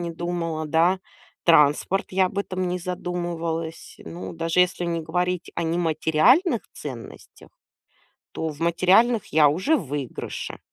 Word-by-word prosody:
не 170 -1 -4
думала, 165 -2 -3
да. 170 +4 +2 0.4
Транспорт, 165 +3 +4
я 190 0 +3
об 195 - -5
этом 185 -2 -2
не 180 +1 -2
задумывалась. 170 -2 -4
Ну, 175 - -8
даже, 165 +2 0
если 180 -1 +1
не 170 -1 -1
говорить 180 +2 -2
о 170 - -1
нематериальных 175 - +2
ценностях, 125 -6 -10 0.8
то 160 - -4
в 150 -1 -6
материальных 185 +7 +3
я 150 -2 +6
уже 185 - +1
в 175 - -3
выигрыше. 140 -3 -5
170 Hz, 135 wpm, -24 LUFS, 160-180 Hz, 0.8 s, я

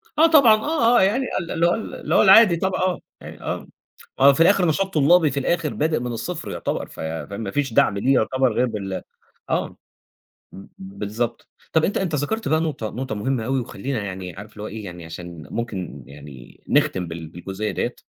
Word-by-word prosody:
آه 315 +2 +6
طبعًا، 280 -9 +7
آه، 240 0 +2
آه، - - +5
يعني 220 +8 +2
ال 170 - -6
اللي 165 +1 +1
هو 175 - +3
ال 225 - -6
اللي - - -2
هو - - +6
العادي 195 -1 +7
طبعًا 190 +3 -1
آه 185 -1 0 0.2
يعني - - -11
آه - - -4 0.5
مهو 140 +1 +7
في 140 - -4
الآخر 185 +1 +4
نشاط 190 +5 0
طلابي 155 +2 +5
في 140 - -2
الآخر 165 +2 -1
بادئ 155 +1 +1
من 125 0 -4
الصفر 150 +9 -5
يعتبر - - -3
ف - - -11
فمافيش 100 - -3
دعم 100 -2 +3
ليه 135 +7 +2
يعتبر 130 +1 +2
غير 125 - +1
بال 100 -5 -4 0.5
آه، - - 0 0.8
ب 95 - -11
بالضبط 105 +5 -4 0.2
طَب 160 -1 +3
أنت 200 - 0
أنت 180 -5 -2
ذكرت 215 +11 -2
بقى 155 0 +2
نقطة 145 -9 -3
نقطة 130 -2 -4
مهمّة 115 +2 -1
أوي 130 +2 0
وخلينا 120 +1 -4
يعني 95 -2 -6
عارف 105 +3 -11
لو 105 - -8
هو 105 - -4
إيه 110 +1 -7
يعني 90 -2 -8
علشان 85 -1 -9
ممكن 95 - -5
يعني 70 -2 -13
نختم 90 -2 +2
بال 80 0 -7
بالجزئية 95 +5 -5
ديّة 95 - -2
125 Hz, 200 wpm, -22 LUFS, -, 0.8 s, طبعًا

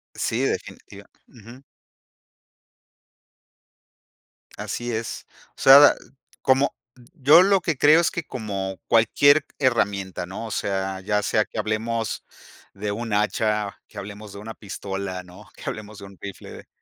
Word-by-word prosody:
S - - -7
sí, - - -1
definitiva - - -4 0.2
Ujú. 120 +4 -15 2.9
Así 120 0 -4
es. 115 +1 -4 0.2
O - - -40
sea, 135 +1 +10
dal 145 - +7 0.5
como 135 +2 +2 0.4
yo 155 +1 +6
lo 195 0 +4
que 165 -5 -2
creo 150 +4 +6
es 170 - +2
que 170 - -4
como 100 -7 -5
cualquier 140 +6 +4
herramienta, 100 -9 0
¿no? 95 +5 -7
O 110 - -7
sea, 95 -1 -2
ya 105 +1 0
sea 105 - +2
que - - -12
hablemos 110 +1 -2 0.5
de 105 +1 -4
un 115 +1 -5
hacha, 105 0 0
que - - -16
hablemos 105 +1 -8
de 100 - -10
una 110 +2 -8
pistola, 95 -2 -6
¿no? 90 +4 -15
Que - - -14
hablemos 105 0 -6
de 100 - -10
un 100 -1 -14
rifle, 100 -1 -9
110 Hz, 145 wpm, -23 LUFS, 100-125 Hz, 2.9 s, sea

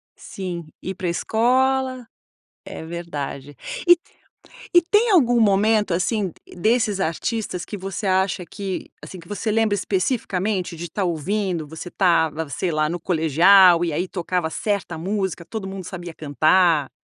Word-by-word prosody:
Sim, 180 -3 -6 0.2
ir 190 - -5
para 180 - -4
a - - +1
escola, 255 +6 +1 0.6
é - - -8
verdade, 145 -5 -6 0.3
e 350 - +8
t 340 - -31 0.6
e 350 - +9
tem 420 +7 +2
algum 245 - +4
momento, 210 -1 +3
assim, 195 +3 0
d 170 - -16
desses 220 +1 +1
artistas 190 +2 -2
que 210 - -7
você 195 +2 -5
acha 190 -1 +1
que, 195 +2 -5
assim, 185 - -9
que 170 - -17
você 210 +2 -3
lembra 220 -1 +2
especificamente 190 -2 -1
de 170 0 -7
tá 195 +3 -2
ouvindo, 175 0 -1
você 160 +3 -8
estava, 160 -4 +1
sei 175 +7 -2
lá, 155 -1 +1
no 175 +2 -3
colegial 175 +2 +5
e 165 - -2
aí 180 +5 -2
tocava 180 -2 -2
certa 200 -1 -2
música, 190 0 -3
todo 200 0 -6
mundo 190 -1 -7
sabia 175 -2 -7
cantar. 155 0 +2
185 Hz, 155 wpm, -22 LUFS, 170-210 Hz, 0.6 s, e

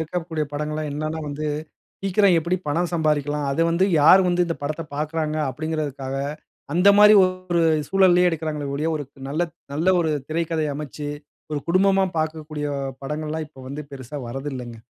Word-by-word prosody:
இருக்கக்கூடிய 160 -1 -3
படங்கல்லாம் 150 +1 -3
என்னன்னா 155 +2 -3
வந்து, 150 +2 -4 0.6
சீக்கிரம் 195 -1 +4
எப்படி 170 +3 0
பணம் 170 +4 0
சம்பாரிக்கலாம்? 150 -2 0
அத 140 - -3
வந்து, 175 +3 +3
யார் 180 +6 +8
வந்து 175 0 +2
இந்த 165 - -2
படத்த 155 +3 -3
பார்க்கிறாங்க? 155 +1 -2
அப்படிங்கிறதுக்காக 140 -2 -3 0.6
அந்த 180 +4 +5
மாதிரி 210 +1 +9
ஒரு 185 -2 -1 0.3
சூழல்லயே 180 -2 +5
எடுக்கிறார்களே 155 -3 -3
ஒழிய, 150 +3 -1
ஒரு 145 - -4 0.3
நல்ல 155 +5 0 0.3
நல்ல 160 +5 0
ஒரு 160 -2 +1 0.2
திரைக்கதை 160 -1 -1
அமைசச்சு. 150 0 -6 0.4
ஒரு 145 - -1
குடும்பமா 195 +2 +4
பார்க்கக்கூடிய 155 -1 -3 0.4
படங்கல்லாம் 155 +2 -3
இப்ப 135 -3 -15
வந்து 140 +3 -5
பெரிசா 135 +2 -8
வரதில்லங்க. 130 -2 -5
155 Hz, 145 wpm, -23 LUFS, 145-170 Hz, 0.6 s, மாதிரி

